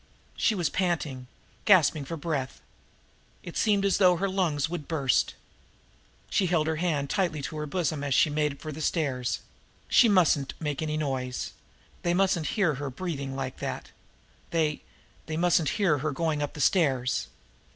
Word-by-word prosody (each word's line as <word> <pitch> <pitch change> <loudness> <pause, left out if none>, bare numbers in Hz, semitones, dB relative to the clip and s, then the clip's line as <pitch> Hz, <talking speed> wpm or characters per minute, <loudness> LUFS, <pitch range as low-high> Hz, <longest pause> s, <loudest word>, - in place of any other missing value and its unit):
She 220 - +2
was 175 -5 +1
panting, 155 -8 -1 0.4
gasping 160 -7 +5
for 165 - -6
her - - -8
breath. 145 -5 -3 0.8
It 170 - -8
seemed 205 -2 +2
as 200 - +2
though 180 -2 +6
her 195 +3 0
lungs 175 -7 0
would 165 -3 -5
burst. 140 -6 +1 0.9
She 190 - +1
held 165 -3 +2
her 160 0 -1
hand 155 -5 0
tightly 170 -1 0
to 155 - -5
her 150 0 -3
bosom 155 -3 -1
as 140 -2 0
she - - +5
made 150 -1 -1
for 155 - -6
the 155 +2 -7
stairs 135 -6 -1 0.5
she 235 - +6
mustn't 160 -8 +3
make 150 -2 -3
any 155 -1 -1
noise 130 -4 -2 0.5
they 175 0 +1
mustn't 180 -5 +2
hear 185 -7 +3
her 145 - -2
breathing 140 -2 -4
like 130 -1 -4
that - - -5 0.6
they 155 -3 0 0.5
they 155 0 -3
mustn't 170 -3 +3
hear 180 -9 +2
her 155 +3 -1
going 155 +1 -1
up 145 - -2
the 150 - -5
stairs. 130 - +2
155 Hz, 170 wpm, -27 LUFS, 140-175 Hz, 0.9 s, though